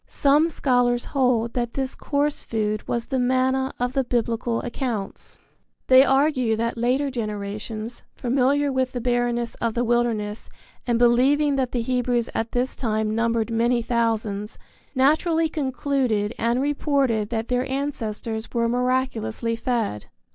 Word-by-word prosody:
Some 295 +4 +3
scholars 245 -5 +1
hold 250 -4 +1
that 240 -1 -2
this 265 -1 -2
coarse 290 0 -1
food 215 -1 -2
was 235 -1 -1
the 265 - -1
manna 260 +1 +1
of 245 +1 -1
the 270 -1 +1
Biblical 235 -1 -1
accounts. 235 -5 -4 0.5
They 260 0 +7
argue 270 -4 +2
that 230 +1 -1
later 255 +4 0
generations, 215 0 -5
familiar 275 +3 +1
with 260 -1 0
the 245 - -2
barrenness 240 -1 0
of 230 -2 -1
the 240 - +1
wilderness 230 -3 -1 0.4
and 240 -1 +2
believing 270 +5 +4
that 255 -2 0
the 240 -2 -1
Hebrews 245 -1 0
at 225 0 -2
this 250 +2 -1
time 215 -3 -1
numbered 230 0 0
many 235 +1 +1
thousands, 225 -3 -1 0.4
naturally 320 +5 +3
concluded 260 -7 -1
and 235 +2 +1
reported 275 -6 +1
that 225 -1 -3
their 250 +1 0
ancestors 230 -5 -3
were 235 -1 +1
miraculously 245 -2 -1
fed. 230 - -2
245 Hz, 140 wpm, -24 LUFS, 230-260 Hz, 0.5 s, They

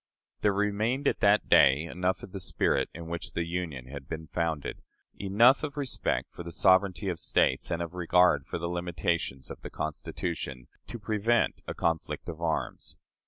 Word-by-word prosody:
There 105 - +3
remained 105 +7 0
at - - +1
that 100 +1 +4
day 70 +2 +6
enough 90 +2 -2
of - - -9
the 95 - -5
spirit 90 - +1
in 85 0 -8
which 85 +1 -5
the 85 - -1
Union 85 -7 -4
had 70 +1 -9
been 80 0 -5
founded 80 -2 -2 0.4
enough 115 +7 +5
of 150 -1 -5
respect 140 -3 -1
for - - -9
the 85 0 -7
sovereignty 95 +2 +3
of 90 -3 -2
States - - +1
and 85 -1 -1
of 85 0 -7
regard 90 0 +3
for - - -3
the 85 - -4
limitations 85 -5 -2
of - - -9
the - - -7
Constitution 75 -4 -4 0.2
to 120 - -5
prevent 110 +1 +1
a - - -4
conflict 80 -2 -1
of 80 0 -7
arms. 80 -2 -3
85 Hz, 175 wpm, -29 LUFS, 80-100 Hz, 0.4 s, day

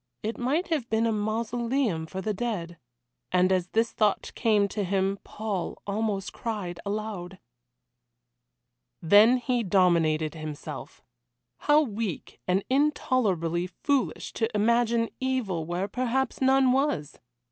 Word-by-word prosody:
It 220 +2 -3
might 290 +10 0
have 295 -8 -1
been 220 +1 +2
a 230 - +2
mausoleum 225 -3 -1
for 190 +3 -5
the 215 +1 -1
dead. 185 -7 -4 0.5
And 185 +1 +3
as 185 -1 +1
this 225 +4 +1
thought 210 -3 +1
came 210 -4 +2
to 205 +1 -2
him 195 +1 0
Paul 205 -5 -4
almost 205 -1 -2
cried 200 -7 -4
aloud. 200 -3 -4 1.6
Then 210 +9 +6
he 245 0 0
dominated 170 -6 +2
himself. 155 -2 -7 0.6
How 295 +1 +4
weak 215 - -4
and 185 +2 +2
intolerably 215 - +1
foolish 275 +7 -1
to 225 -1 0
imagine 235 +1 +2
evil 225 -11 -1
where 175 +3 -2
perhaps 255 +4 -1
none 265 -1 +4
was! 260 - 0
215 Hz, 125 wpm, -27 LUFS, 185-240 Hz, 1.6 s, Then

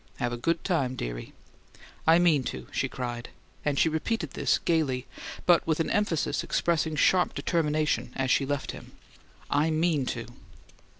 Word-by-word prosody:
Have 120 0 -1
a - - -3
good 165 +7 0
time, 140 -8 0
dearie." - - -5 0.8
"I 165 +1 +7
mean 170 -5 +4
to!" 65 -1 -5
she - - -1
cried; 120 -1 -5 0.3
and 145 -2 0
she - - +4
repeated 160 +1 -1
this - - +1
gaily, 140 -7 0 0.4
but 175 -2 +6
with 160 -1 +1
an 165 - 0
emphasis 205 -8 0
expressing 160 -2 0
sharp 180 +4 +3
determination 155 -2 0
as 130 -1 0
she - - +4
left 145 -1 -2
him. - - -11 0.6
"I 145 +3 +3
MEAN 155 -4 +1
to!" 115 -2 -3
155 Hz, 160 wpm, -28 LUFS, 130-165 Hz, 0.8 s, I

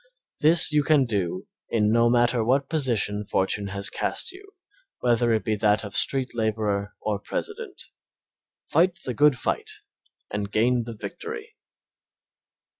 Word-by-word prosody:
This 160 +1 +4
you 150 0 +4
can 145 -2 +3
do 95 -6 -2 0.2
in 105 -2 +2
no 115 +1 +4
matter 120 -1 +3
what 135 +4 +2
position 115 -9 0
fortune 100 +1 -1
has 100 +1 -3
cast - - -3
you, 395 +2 -15 0.5
whether 120 -1 +2
it 110 -1 +1
be 110 -2 +1
that 105 0 +2
of 100 -2 -7
street 130 -2 +1
laborer 105 -3 -1
or 105 -2 -2
president. 425 - -6 0.8
Fight 175 +1 +2
the 125 - -2
good 145 +2 +4
fight - - -2 0.6
and 100 0 -3
gain 120 +2 +2
the 115 -2 -8
victory. 445 -1 -7
120 Hz, 140 wpm, -25 LUFS, 105-150 Hz, 0.8 s, This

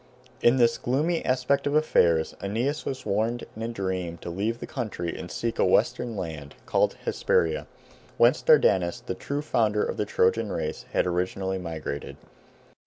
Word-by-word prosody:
In 120 +2 +5
this 120 -2 +3
gloomy 155 +7 0
aspect 130 +3 +1
of 145 - 0
affairs 85 - +3
Aeneas 120 +10 -1
was 130 - -4
warned 115 +4 0
in 110 - -8
a 115 - -2
dream 95 -6 -3
to 85 - -5
leave 105 +6 -1
the - - -5
country 105 -9 -4
and 90 - -7
seek 115 +4 -3
a - - +5
western 120 -3 +2
land, 80 -6 -6
called - - +2
Hesperia, 80 -3 +1 0.5
whence - - +5
Dardanus, 85 -2 +4
the - - -2
true 145 +1 -4
founder 110 -7 +1
of - - -4
the 105 - 0
Trojan 105 +2 +1
race, 75 - -3
had - - +2
originally 95 +2 -1
migrated. 80 -5 -5
105 Hz, 165 wpm, -26 LUFS, 85-120 Hz, 0.5 s, In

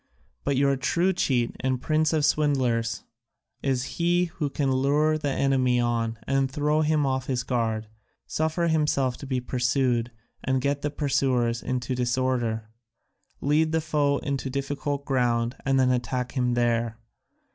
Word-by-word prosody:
But 140 - 0
your 140 0 +3
true 170 +7 +1
cheat 125 -9 0
and 130 -1 0
prince 155 +3 +1
of 155 -2 +2
swindlers 130 -7 +1 0.6
is 130 -2 0 0.2
he 175 +1 +3
who 160 -4 -3
can 140 -1 0
lure 145 +4 +2
the 150 -2 -2
enemy 130 -2 +2
on 115 -1 0
and 135 0 +1
throw 150 +3 +1
him 155 -1 +2
off 130 -1 -1
his 125 -2 -1
guard, 110 -4 -1 0.4
suffer 160 +2 -1
himself 150 -5 +1
to 140 - -9
be 130 -1 0
pursued 125 -1 0 0.3
and 130 0 +1
get 140 +2 -1
the 150 - -1
pursuers 130 -5 0
into 130 0 -2
disorder, 120 -3 0 0.7
lead 155 +3 +2
the 160 - +3
foe 150 -3 +1
into 140 -1 -3
difficult 140 +1 -3
ground 120 -2 +1
and 135 0 +3
then 130 -1 +4
attack 125 0 -1
him 125 -2 0
there. 115 -2 0
135 Hz, 150 wpm, -26 LUFS, 125-145 Hz, 0.7 s, then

